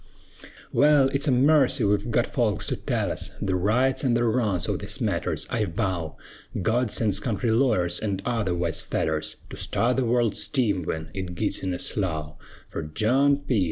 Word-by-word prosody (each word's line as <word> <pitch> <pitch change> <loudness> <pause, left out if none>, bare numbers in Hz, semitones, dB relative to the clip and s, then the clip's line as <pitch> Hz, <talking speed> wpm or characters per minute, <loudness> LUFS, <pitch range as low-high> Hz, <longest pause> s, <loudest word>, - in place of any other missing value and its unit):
Wal, 140 +1 +5
it's 140 +3 0
a - - +4
marcy 135 -1 +4
we've 105 +2 +1
gut 120 +1 +2
folks 110 -6 0
to - - +1
tell - - -1
us - - -3
The 95 - -1
rights 125 - +1
an' 125 -3 +2
the 120 - +2
wrongs 110 -6 0
o' - - 0
these - - -3
matters, - - -1
I 110 -2 +1
vow, 85 -3 -3 0.4
God 115 +5 +1
sends 105 -4 0
country 115 +1 -1
lawyers, 110 -8 +2
an' 100 -3 -2
other 115 -7 0
wise 85 -2 -1
fellers, 80 -1 -2 0.2
To - - -7
start 125 +2 0
the 130 - +1
world's 120 -2 +1
team 115 -10 +1
wen 80 -1 -4
it 95 -2 -5
gits 105 +3 -2
in 95 - -2
a 90 - -2
slough; 80 -8 -3 0.4
Fer - - -3
John 135 +6 +3
P. 120 -5 +2
110 Hz, 185 wpm, -25 LUFS, 95-125 Hz, 0.4 s, Wal